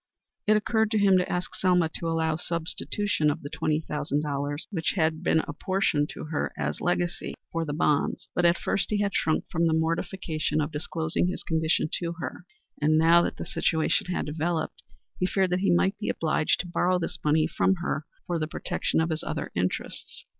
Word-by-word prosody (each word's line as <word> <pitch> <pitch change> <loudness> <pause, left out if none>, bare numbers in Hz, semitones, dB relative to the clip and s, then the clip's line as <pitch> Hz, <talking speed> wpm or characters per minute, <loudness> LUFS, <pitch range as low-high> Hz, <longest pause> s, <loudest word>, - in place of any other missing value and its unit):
It 215 0 +6
occurred 220 0 +1
to 220 - +1
him 200 -2 +5
to 180 - -1
ask 180 0 -2
Selma 180 -3 +3
to 165 - -4
allow 160 -1 +1
substitution 170 +1 0
of 145 - -2
the 145 - -6
twenty 155 0 0
thousand 150 -1 -2
dollars, 145 0 -2
which 165 -6 0
had 160 -2 +1
been 160 -2 +3
apportioned, 150 -2 0
to - - -6
her 150 - -1
as 75 0 -2
her - - -6
legacy, 175 +1 -1 0.2
for 165 0 -1
the 145 - -3
bonds, 150 -1 +1
but 175 - +1
at 170 +1 +5
first 195 - -1
he 210 - +1
had 200 -1 0
shrunk 155 - +1
from 170 0 +2
the 160 - +2
mortification 165 -1 -1
of 150 +1 -1
disclosing 160 +2 -1
his 180 - -3
condition 160 -1 +1
to 170 -1 -2
her, 175 +1 -6 0.4
and 155 +1 +4
now 165 +2 +6
that - - -2
the - - -5
situation 160 +1 +1
had 180 - -1
developed, 160 +2 -2 0.4
he 185 - +2
feared 190 -1 +1
that 180 - +2
he 195 - +1
might 190 +3 +3
be 210 - -2
obliged 155 -1 +1
to 180 - -9
borrow 180 +1 +2
this 175 -1 -4
money 155 +1 +3
from 175 +4 +2
her 170 -3 -3 0.2
for 175 -2 -1
the 155 - -1
protection 155 - -1
of 165 +1 0
his 160 - -1
other - - -4
interests. 90 +1 -3
165 Hz, 205 wpm, -27 LUFS, 155-180 Hz, 0.4 s, It